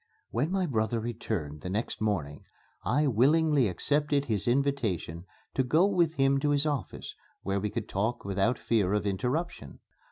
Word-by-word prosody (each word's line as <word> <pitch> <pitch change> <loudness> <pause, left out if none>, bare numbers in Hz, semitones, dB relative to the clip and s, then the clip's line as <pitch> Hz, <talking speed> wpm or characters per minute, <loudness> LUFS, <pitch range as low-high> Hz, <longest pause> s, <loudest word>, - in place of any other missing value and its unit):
When 130 +7 0
my 190 0 0
brother 115 -5 0
returned 110 -10 -4
the 90 - -5
next 105 +4 -3
morning, 80 -10 -2 0.4
I 150 +1 +2
willingly 145 +2 +3
accepted 145 - 0
his 110 -5 -1
invitation 120 - 0 0.3
to - - +2
go 155 +8 +4
with 175 -5 +2
him 135 0 +3
to 145 +1 0
his 145 +1 +3
office, 145 -3 -3 0.3
where 100 +1 0
we 105 +2 -2
could - - -4
talk 110 +5 -2
without 100 +5 +1
fear 105 -4 +1
of 105 - -1
interruption. 125 - -2
120 Hz, 160 wpm, -29 LUFS, 100-145 Hz, 0.4 s, go